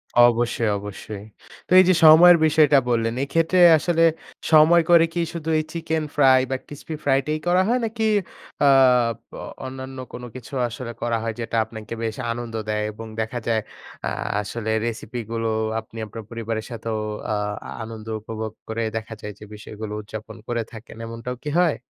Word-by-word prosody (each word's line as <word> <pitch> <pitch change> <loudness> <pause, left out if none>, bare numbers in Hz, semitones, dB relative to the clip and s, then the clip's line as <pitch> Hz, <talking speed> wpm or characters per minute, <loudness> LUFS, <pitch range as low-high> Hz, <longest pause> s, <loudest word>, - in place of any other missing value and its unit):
অবশ্যই, 120 -1 +4
অবশ্যই। 100 0 -8 0.4
তো - - -25
এই - - +8
যে, - - +6
সময়ের 170 +3 +9
বিষয়টা 150 -2 +5
বললেন, 115 -1 +1
এক্ষেত্রে 165 +5 +1 0.2
আসলে 165 +1 +1 0.5
সময় 160 +2 +7
করে 170 -1 +7
কি 170 - 0
শুধু 160 -2 -5
এই - - -1
chicken 160 -1 -2
fry 135 -3 +6
বা - - +1
crispy 150 +2 -7
fry 135 -1 +3
try 155 0 -1
করা 180 +1 +4
হয়? 245 +3 +2
নাকি 225 0 -2 0.6
আ - - +6 0.8
অ - - -6 0.2
অন্যান্য 130 0 -7 0.2
কোন 125 - -7
কিছু 130 +1 -10
আসলে 120 +1 -7
করা 120 -1 0
হয়? 115 -1 -2
যেটা 115 0 -4
আপনাকে 110 0 -9
বেশ 110 -1 -2 0.2
আনন্দ 120 0 -5 0.2
দেয়। 105 0 0
এবং 115 +2 -9
দেখা 110 +2 -3
যায় 115 -1 +2 0.5
আ - - 0 0.3
আসলে 110 +2 -5 0.2
recipe 115 +1 -4
গুলো 115 -1 -1 0.3
আপনি 110 0 -13
আপনার 110 +1 -9
পরিবারের 115 -1 -4
সাথেও 115 -1 -4 0.3
আ - - +1 0.5
আনন্দ 110 -1 -9
উপভোগ 110 0 -6 0.2
করে 115 +1 -2
দেখা 110 0 -6
যায় 105 -1 -6
যে, - - -11
বিষয়গুলো 105 0 -8
উদযাপন 110 +1 -9
করে 120 -1 -1
থাকেন। 115 0 -11
এমনটাও 115 +2 -6
কি 150 - -3
হয়? 175 -4 +3
120 Hz, 170 wpm, -23 LUFS, 110-155 Hz, 0.8 s, সময়ের